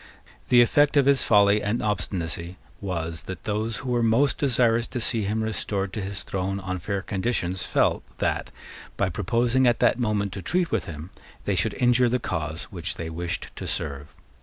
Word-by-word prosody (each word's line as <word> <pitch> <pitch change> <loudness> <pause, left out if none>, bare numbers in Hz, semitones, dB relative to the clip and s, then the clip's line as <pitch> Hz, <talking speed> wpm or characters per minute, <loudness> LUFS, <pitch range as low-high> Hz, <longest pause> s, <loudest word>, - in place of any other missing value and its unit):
The 120 -1 +7
effect 145 +5 +4
of 140 - +5
his 140 -1 +5
folly 105 -1 +4
and 105 +4 -1
obstinacy 90 -4 -3 0.2
was 85 -4 -3
that 95 -2 -6
those 110 +1 -2
who 130 - -4
were 120 -1 +2
most 115 +5 +3
desirous 120 -4 +2
to 125 - -4
see 115 -2 +1
him 110 +2 -1
restored 100 -3 -2
to 105 - -3
his 100 +1 -4
throne 95 +1 -2
on 95 -1 -4
fair 100 +2 -3
conditions 95 -3 -2
felt - - +2 0.2
that, - - -1 0.5
by 100 - +1
proposing 120 +8 +1
at 120 - +3
that - - +3
moment 105 -4 0
to 95 - -5
treat 175 - 0
with 115 -5 0
him, 80 +2 -8 0.3
they - - +1
should - - 0
injure 125 0 +3
the 125 - +2
cause 80 -8 -3
which - - -4
they 80 -1 -5
wished 85 +2 -4
to - - -6
serve. 70 -1 -4
105 Hz, 185 wpm, -25 LUFS, 90-120 Hz, 0.5 s, The